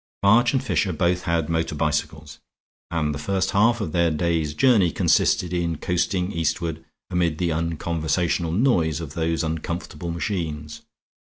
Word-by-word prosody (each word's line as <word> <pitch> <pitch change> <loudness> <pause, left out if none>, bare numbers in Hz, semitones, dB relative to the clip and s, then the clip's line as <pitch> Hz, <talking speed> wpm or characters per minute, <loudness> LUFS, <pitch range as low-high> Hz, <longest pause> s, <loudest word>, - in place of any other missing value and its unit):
March 120 +5 +5
and 135 - 0
Fisher 90 0 0
both 90 +2 0
had 85 -2 0
motor 80 -1 -1
bicycles; 75 0 -2 0.5
and 80 -3 -1
the 70 - -5
first 95 +4 -1
half 115 +4 +3
of 100 -8 -3
their 85 0 +2
day's 80 -1 -1
journey 110 - +4
consisted 90 +2 +2
in 85 -2 -1
coasting 90 +3 -1
eastward 80 -1 -2 0.3
amid 85 -3 +1
the 90 0 0
unconversational 85 +1 -1
noise 85 - +2
of 80 -4 -7
those 80 0 -1
uncomfortable 80 +1 -4
engines. 80 -4 -4
85 Hz, 145 wpm, -23 LUFS, 80-90 Hz, 0.5 s, March